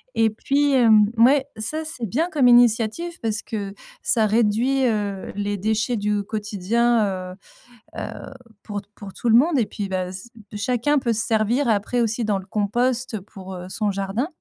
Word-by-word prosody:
et 225 -1 +3
puis, 280 +6 0
hem 225 -5 +6
ouais, 265 +4 +5
ça 305 +9 -2
c'est 255 -7 -4
bien 305 - -1
comme 280 -6 +3
initiative 240 +7 +3
parce 220 -2 -1
que 200 -3 -5 0.3
ça 225 -3 +2
réduit, 235 +5 +2
heu, 205 -4 -2
les 205 0 -2
déchets 220 +4 0
du 205 0 -1
quotidien, 205 -1 0
heu - - -13 0.6
heu, - - -5 0.5
pour 205 -2 -5
pour 195 -2 -10
tout 240 - -2
le 225 - +6
monde, 300 +4 +3
et 230 - +2
puis, 205 0 -5
bah, 185 -1 -2
c 190 +5 -9 0.3
chacun 250 +6 +1
peut 235 -3 0
se 220 - +2
servir 230 +4 +1
après 220 +3 +1
aussi 230 0 0
dans 210 -2 +1
le 190 - -8
compost 230 +3 -1
pour, 190 -1 -11
heu, 180 0 -8
son 210 +2 -1
jardin, 195 +7 -2
220 Hz, 175 wpm, -22 LUFS, 205-245 Hz, 0.6 s, hem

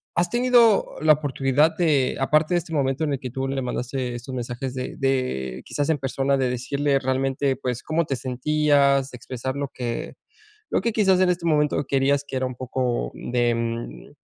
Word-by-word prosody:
¿has 175 - +1
tenido 240 -3 +4
la 155 0 +6
oportunidad 145 +1 +1
de 150 -7 +2
aparte 155 +5 +2
de 175 - +4
este 165 - -10
momento 135 +1 0
en 145 - 0
el 135 - -2
que 125 -2 -6
tú 135 +1 -3
le 135 0 -2
mandaste 125 0 -3
estos 125 +2 -7
mensajes 125 +2 -4
de 130 0 -4
de, 125 - -1
quizás 145 +1 -2
en 160 - +2
persona 135 +1 0
de 130 -2 +1
decirle 140 +3 0
realmente, 135 +1 0
pues, 125 -2 -3
cómo 160 +1 0
te 135 - -2
sentías? 140 +1 +2
Expresar 130 +2 -5
lo 140 -1 -3
que 120 -2 -4 0.6
lo - - +1
que 230 - 0
quizás, 190 -4 +3
en 185 - +4
este 175 -1 -1
momento 150 -2 +2
querías 140 +1 +2
que - - -6
era 130 - 0
un 130 -1 -5
poco 125 - -2
de, 120 -1 0
mm, 115 0 -5
135 Hz, 190 wpm, -24 LUFS, 125-150 Hz, 0.6 s, la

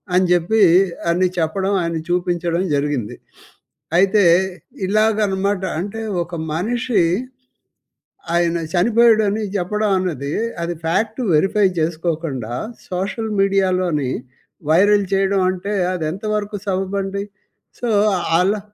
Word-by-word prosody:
అని 185 +1 +4
చెప్పి 180 +6 +2 0.5
అని 180 +2 +2
చెప్పడం 190 +5 0
ఆయనని 170 -1 -2
చూపించడం 175 0 0
జరిగింది. 140 -5 -2 0.8
అయితే 195 +3 +4 0.6
ఇలాగ 215 +2 +2
అన్నమాట 195 0 -1 0.2
అంటే 205 +5 -5 0.2
ఒక 170 +1 -8 0.2
మనిషి 225 +4 0 1.3
ఆయన 170 0 +2 0.2
చనిపోయాడని 220 +1 +3
చెప్పడం 210 +3 -1
అన్నది 155 -6 -3 0.3
అది 170 +1 -2
ఫ్యాక్టు 215 +8 0
వెరిఫై 195 +6 +3
చేసుకోకుండా 155 -7 -2 0.4
సోషల్ 195 +5 -3
మీడియాలోని 185 -7 +1 0.6
వైరల్ 200 +5 +4
చేయడం 195 0 +2
అంటే 185 +3 -3 0.2
అది 180 -3 -3
ఎంతవరకు 210 +2 -3
సబబండి. 195 +1 -2 0.6
సో 240 - -2 0.5
అలా 200 +4 +2
190 Hz, 100 wpm, -19 LUFS, 170-205 Hz, 1.3 s, అని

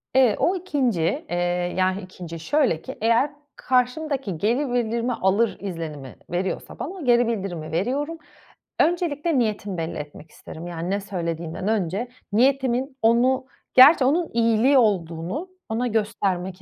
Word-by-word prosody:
Eee, 255 -5 +5
o 365 - +2
2'nci 260 - 0
eee, 175 - -2 0.4
yah 185 0 +2
2'nci 175 -2 -9
şöyle 230 - +1
ki 265 - -8
eğer 230 +6 +3 0.2
karşımdaki 255 - 0
geri 240 - 0
bildirimi 235 0 0
alır 205 +2 +1
izlenimi 160 -8 -6
veriyorsa 180 +2 -3
ben - - -2
o 355 0 -7
geri 240 -1 +4
bildirimi 190 -8 -3
veriyorum. 270 - -1 0.6
Öncelikle 330 -3 +1
niyetimi 210 -4 -1
belli 165 0 -3
etmek 150 +1 -9
isterim. 165 +2 -10
Yani 170 0 -4
ne 200 +1 0
söylediğimden 170 -2 -4
önce 210 +1 0 0.3
niyetimin 260 +2 +2
onu 250 +3 +3 0.3
gerçi 265 +2 +8
onun 320 +5 +2
iyiliği 230 +4 +4
olduğunu 190 - 0 0.2
ona 230 +3 0
göstermek 190 -4 -1
225 Hz, 135 wpm, -24 LUFS, 180-260 Hz, 0.6 s, gerçi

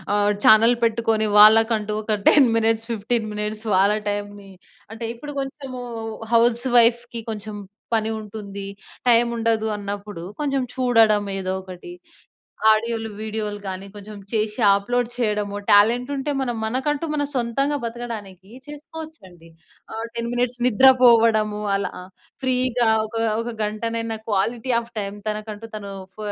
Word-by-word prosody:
ఆహ్, 205 0 +2
ఛానల్ 225 +3 +7
పెట్టుకొని, 225 -1 +1
వాళ్ళకంటూ 215 0 +5
ఒక 215 -1 0
10 280 -4 +6
మినిట్స్, 225 0 +1
15 225 +1 -1
మినిట్స్ 210 +1 -4
వాళ్ళ 200 +3 +4
టైమ్‌ని 205 -1 -5 0.4
అంటే, 230 +1 -6
ఇప్పుడు 290 +5 -8
కొంచెము 270 -2 -7 0.5
హౌస్ 235 +1 +3
వైఫ్‌కి 235 0 +3
కొంచెం 210 0 -7 0.4
పని 220 0 +1
ఉంటుంది, 200 -2 -8 0.4
టైముండదు 230 -2 +2
అన్నప్పుడు 200 -2 -6 0.2
కొంచం 275 -3 0
చూడడం 225 -5 +3
ఏదో 185 -1 -3
ఒకటి, 185 - -10 0.8
ఆడియోలు, 225 0 +1
వీడియోలు 215 -1 -4
గానీ, 190 +1 -6
కొంచెం 210 +1 -10 0.2
చేసి 215 +1 -1
అప్లోడ్ 240 +4 -1
ఆహ్, - - -15
చెయడము, 210 -3 -1
టాలెంటుంటే, 250 +7 +3
మనం 240 -3 -2
మనకంటూ 280 +7 -1
మన 290 -1 0
సొంతంగా 275 +4 0
బతకడానికీ 215 -5 -7 0.2
చేసుకోవచ్చండి. 295 - -11 0.5
ఆహ్, 225 +1 -4
10 235 0 -3
మినిట్స్ 245 0 -1
నిద్ర 255 +3 +5 0.2
పోవడము, 220 -3 +4
అలా 195 - -2
ఆహ్, 185 - -12 0.3
ఫ్రీగా 250 -2 +1 0.2
ఒక, 220 - -11 0.3
ఒక 235 0 -5
గంటనైనా 225 +1 -3
క్వాలిటీ 225 +5 -1
ఆఫ్ 235 0 -11
టైమ్ 200 +1 -6
తనకంటూ 215 +1 -6
తనూ 200 -2 -7 0.2
ఫ - - -38
225 Hz, 130 wpm, -22 LUFS, 210-240 Hz, 0.8 s, ఛానల్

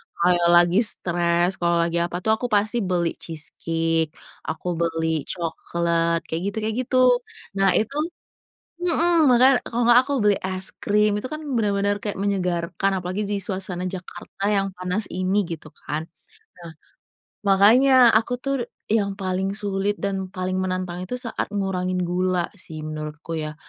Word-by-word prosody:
kalau 175 0 +2
lagi 175 +3 +5
stres 175 -4 0
kalau 170 0 +2
lagi 170 0 0
apa 175 +1 -2
tuh 220 - +2
aku 245 - -1
pasti 215 +1 +1
beli 180 -5 0
cheese 160 -2 -6
cake, 165 -1 0 0.3
aku 160 +3 -4
beli 165 -1 0 0.2
coklat, 170 0 -1
kayak 160 +1 -3
gitu 200 - -4
kayak 220 0 -1
gitu. - - -2 0.6
Nah, 195 -1 +4
itu, 220 +6 0 0.9
mhm, 340 -2 +3
makanya, 250 +1 +5
kalau 240 +1 -1
enggak 240 +1 +7
aku - - -1
beli 205 -1 +4
es 185 0 -3
krim 210 +1 +3
itu 255 - -6
kan 305 +2 -6 0.2
benar-benar 205 -2 +1
kayak 205 -1 -4
menyegarkan 190 -1 0
apalagi 185 +3 -3
di 205 - -1
suasana 185 -2 -4
Jakarta 185 +1 -5
yang 195 -2 +1
panas 180 +3 -2
ini 185 +3 +1
gitu 165 -3 -7
kan. 155 +3 -5 0.5
Nah, 170 -2 -10 0.8
makanya 240 +6 +6
aku 230 +2 -3
tuh 275 0 -1 0.4
yang 205 -3 +1
paling 190 0 -1
sulit 200 -1 -1
dan 195 -1 -2
paling 185 0 -2
menantang 185 -1 -3
itu 220 - -5
saat 240 -2 -3
ngurangin 185 -2 -1
gula 180 0 0
sih 160 -4 -8
menurutku 155 +1 -6
ya. 155 -1 -4
185 Hz, 150 wpm, -23 LUFS, 170-205 Hz, 0.9 s, enggak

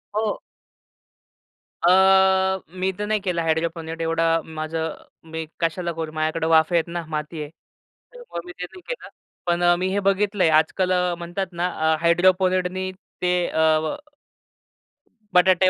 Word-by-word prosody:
हो. 215 -1 -1 1.4
अ, 190 +1 +5 0.2
मी 190 +1 +1
तर 210 - -2
नाही 215 -1 +1
केला 180 -4 -1
हायड्रोपोनिक. 165 0 -2
एवढा 165 0 +1
माझं 160 0 -3 0.4
मी 160 0 -4
कशाला 170 +1 -1
करू? 160 -1 -5
माझ्याकडं 160 +1 -1
वाफे 160 +1 +4
आहेत 165 0 +2
ना, 170 0 -4
माती 150 +1 -4
आहे, 145 - -6 0.6
त्यामुळे 485 - -8
मी 180 - -8
ते - - -2
नाही 365 - -13
केलं. - - -5 0.4
पण 175 0 +1
अ, 175 0 +5
मी 185 +1 -1
हे 205 - +1
बघितलंय 195 -3 +2
आजकाल 185 +4 0
अ, 180 -1 +1
म्हणतात 175 +2 -4
ना, 175 +1 -1 0.3
अ, - - +3
हायड्रोपोनिक 185 +2 +3
नी 185 0 -3 0.3
ते 180 0 +2
अ 160 0 +3
व 155 - -2 1.4
बटाटे 185 0 +5
175 Hz, 150 wpm, -23 LUFS, 165-185 Hz, 1.4 s, अ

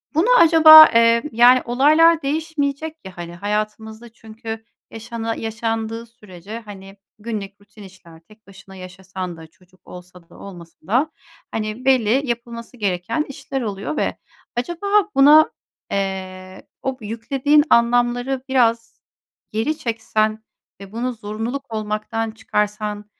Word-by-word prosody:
Bunu 340 +10 +2
acaba, 315 -1 +10
eee, 230 0 +4
yani, 245 +2 +5
olaylar 310 +7 +4
değişmeyecek 310 +1 -3
ya, 190 -2 -11
hani, 170 0 -8
hayatımızda 215 +4 -4
çünkü 225 0 -9 0.3
yaşana 225 0 -5
yaşandığı 225 0 -4
sürece, 210 -2 -11
hani, 200 -3 -12 0.2
günlük 205 -3 -7
rutin 205 +1 -16
işler, 180 -4 -16
tek 215 +5 -23
başına 195 0 -15
yaşasan 185 -1 -8
da 160 - -12
çocuk 180 +3 -28
olsa 180 -1 -14
da - - -17
olmasa 175 -4 -12
da, 260 +9 +1 0.4
hani, 215 +3 -5
belli 260 +1 +2
yapılması 235 0 -6
gereken 205 - -2
işler 270 0 -6
oluyor 205 +4 -5
ve - - -2 0.4
acaba 345 +10 -4 0.3
buna, 295 +3 +6 0.4
eee, 185 -1 -5 0.2
o 265 -1 -3
yüklediğin 265 +7 +1
anlamları 245 +2 +2
biraz 230 -3 0 0.5
geri 230 +9 -2
çeksen 220 -1 -2 0.4
ve 195 - -11
bunu 245 +2 -3
zorunluluk 225 +4 -6
olmaktan 215 +1 -3
çıkarsan, 210 -1 -3
225 Hz, 120 wpm, -20 LUFS, 200-255 Hz, 0.5 s, acaba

